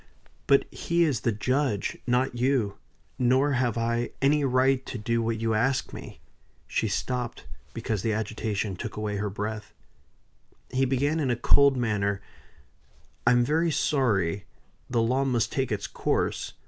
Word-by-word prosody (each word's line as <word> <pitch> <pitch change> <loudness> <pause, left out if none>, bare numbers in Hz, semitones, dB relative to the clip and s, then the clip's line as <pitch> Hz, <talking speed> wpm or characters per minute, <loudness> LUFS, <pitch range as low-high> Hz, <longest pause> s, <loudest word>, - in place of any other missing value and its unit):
But 140 - +5
he 170 0 +1
is 145 -8 +1
the 115 - 0
judge, 125 0 0
not 125 +1 +2
you; 120 -5 0 0.4
nor 130 +3 +3
have 125 -3 +1
I 115 +1 0
any 145 +2 +3
right 130 0 +3
to - - -5
do 115 +2 0
what 115 -1 -1
you 115 0 0
ask 125 +5 0
me." - - -9 0.5
She 110 - -1
stopped, 120 +4 -3 0.3
because 110 -4 -2
the 115 - 0
agitation 105 -2 -2
took 90 - -6
away 105 -1 -2
her 105 +1 -2
breath. 105 +1 -5 1.0
He 130 +1 +2
began 140 +5 +1
in 140 -4 0
a 120 - +2
cold 135 +3 +4
manner: 100 -4 0 1.1
"I 125 - +7
am 120 0 +4
very 160 +5 +2
sorry. 105 - +1 0.4
The 120 -2 +2
law 130 +4 +2
must 125 -4 0
take 135 -5 -1
its 105 -2 -2
course. - - -1
120 Hz, 155 wpm, -27 LUFS, 110-135 Hz, 1.1 s, I